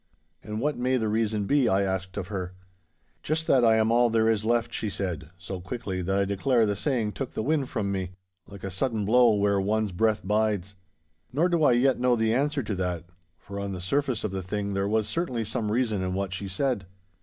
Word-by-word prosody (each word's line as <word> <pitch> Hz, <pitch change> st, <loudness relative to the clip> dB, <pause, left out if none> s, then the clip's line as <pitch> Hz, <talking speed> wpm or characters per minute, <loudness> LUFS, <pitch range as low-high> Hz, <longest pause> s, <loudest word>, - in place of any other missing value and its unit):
'And 105 Hz, 0 st, -5 dB
what 145 Hz, +1 st, -1 dB
may 130 Hz, +1 st, +2 dB
the 110 Hz, -3 st, 0 dB
reason 110 Hz, -1 st, 0 dB
be?' 140 Hz, +1 st, +3 dB
I 95 Hz, +1 st, +3 dB
asked 95 Hz, 0 st, -3 dB
of 95 Hz, -2 st, -4 dB
her. 95 Hz, -3 st, -4 dB, 0.7 s
'Just 160 Hz, +2 st, -1 dB
that 130 Hz, -5 st, +4 dB
I 115 Hz, -1 st, +6 dB
am 110 Hz, 0 st, +2 dB
all 120 Hz, 0 st, +4 dB
there 110 Hz, 0 st, +2 dB
is 110 Hz, -2 st, +2 dB
left,' 115 Hz, 0 st, +1 dB
she 110 Hz, -, -2 dB
said, 85 Hz, -7 st, -4 dB
so 90 Hz, 0 st, -6 dB
quickly 95 Hz, -2 st, -4 dB
that 95 Hz, +2 st, 0 dB
I 100 Hz, -, +2 dB
declare 115 Hz, +4 st, +2 dB
the 105 Hz, -1 st, 0 dB
saying 115 Hz, -2 st, 0 dB
took 130 Hz, +3 st, -5 dB
the -, -, -1 dB
wind 145 Hz, -1 st, 0 dB
from 105 Hz, -5 st, -2 dB
me, 95 Hz, -2 st, -2 dB, 0.4 s
like 100 Hz, -2 st, -12 dB
a 95 Hz, -, -4 dB
sudden 110 Hz, +2 st, -1 dB
blow 120 Hz, +1 st, +5 dB
where 100 Hz, -1 st, +2 dB
one's 105 Hz, +1 st, 0 dB
breath 110 Hz, +3 st, +1 dB
bides. 105 Hz, -2 st, 0 dB, 0.6 s
Nor 160 Hz, +7 st, +2 dB
do 170 Hz, -3 st, +2 dB
I 130 Hz, -, +6 dB
yet 130 Hz, +2 st, +3 dB
know 125 Hz, 0 st, +3 dB
the 110 Hz, -1 st, +1 dB
answer 140 Hz, +2 st, +1 dB
to 110 Hz, -, -3 dB
that, 90 Hz, -2 st, -2 dB, 0.3 s
for 100 Hz, +5 st, -8 dB
on 100 Hz, -1 st, -3 dB
the 90 Hz, -, -5 dB
surface 130 Hz, +5 st, 0 dB
of 105 Hz, -, -2 dB
the 95 Hz, 0 st, -3 dB
thing 100 Hz, +2 st, -3 dB
there 100 Hz, 0 st, 0 dB
was 110 Hz, 0 st, +1 dB
certainly 130 Hz, -10 st, -2 dB
some 105 Hz, 0 st, -2 dB
reason 110 Hz, -4 st, +1 dB
in 90 Hz, 0 st, -2 dB
what 95 Hz, -1 st, -2 dB
she 100 Hz, +1 st, -4 dB
said. 100 Hz, 0 st, -1 dB
110 Hz, 225 wpm, -27 LUFS, 95-120 Hz, 0.7 s, I